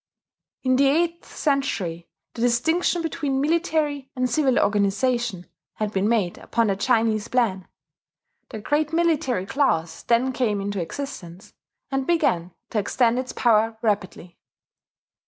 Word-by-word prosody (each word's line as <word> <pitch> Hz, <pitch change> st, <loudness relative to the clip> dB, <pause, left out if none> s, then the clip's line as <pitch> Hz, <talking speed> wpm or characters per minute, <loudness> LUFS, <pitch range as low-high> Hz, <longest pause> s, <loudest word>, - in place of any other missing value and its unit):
In 255 Hz, -1 st, +3 dB
the 275 Hz, +1 st, +4 dB
eighth 335 Hz, +4 st, +1 dB
century 205 Hz, -, -2 dB, 0.3 s
the 230 Hz, -, -6 dB
distinction 320 Hz, +9 st, +1 dB
between 285 Hz, -4 st, -1 dB
military 300 Hz, -3 st, 0 dB
and 255 Hz, 0 st, +1 dB
civil 260 Hz, +1 st, +2 dB
organization 205 Hz, 0 st, +1 dB, 0.3 s
had 215 Hz, -1 st, -3 dB
been 195 Hz, +2 st, +1 dB
made 210 Hz, -7 st, 0 dB
upon 230 Hz, -1 st, 0 dB
the 200 Hz, -2 st, +1 dB
Chinese 220 Hz, 0 st, +1 dB
plan; 225 Hz, -7 st, 0 dB, 0.8 s
the -, -, -6 dB
great 295 Hz, +7 st, 0 dB
military 320 Hz, -, +1 dB
class 170 Hz, -, 0 dB
then 245 Hz, +3 st, +1 dB
came 220 Hz, -5 st, 0 dB
into 200 Hz, -1 st, -3 dB
existence, 185 Hz, -3 st, -7 dB, 0.4 s
and 270 Hz, -1 st, -1 dB
began 235 Hz, -, +1 dB, 0.2 s
to 220 Hz, -, +1 dB
extend 235 Hz, +4 st, +1 dB
its 255 Hz, 0 st, -4 dB
power 225 Hz, -1 st, +2 dB
rapidly. 185 Hz, -5 st, -2 dB
240 Hz, 130 wpm, -24 LUFS, 205-280 Hz, 0.8 s, the